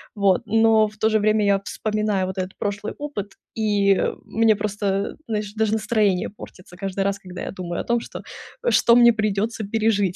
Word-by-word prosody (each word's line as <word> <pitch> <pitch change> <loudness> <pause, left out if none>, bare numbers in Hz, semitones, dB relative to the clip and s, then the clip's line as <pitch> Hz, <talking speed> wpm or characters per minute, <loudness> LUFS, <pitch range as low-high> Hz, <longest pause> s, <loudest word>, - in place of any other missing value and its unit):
Вот. 200 -1 +3
Но 225 0 +4
в 215 - -14
то 220 +1 +2
же 215 0 +2
время, 215 0 +2
я 200 -1 +3
вспоминаю 210 -3 -1
вот 190 +1 -6
этот 185 +1 -5
прошлый 205 +1 -3
опыт, 215 -10 -5 0.2
и 205 -3 +2 0.3
мне 225 0 +3
просто, 205 -1 -2
знаешь, 210 -2 -3
даже 220 -1 0
настроение 210 -4 +1
портится 185 -3 -13
каждый 195 +1 -3
раз, 200 0 -1
когда 180 -1 -9
я - - -4
думаю 175 -2 -4
о - - -6
том, 235 0 +1
что - - -8 0.5
что 235 - +5
мне 235 -1 +7
придется 215 +1 -1
пережить. 205 -3 +1
210 Hz, 185 wpm, -22 LUFS, 195-220 Hz, 0.5 s, мне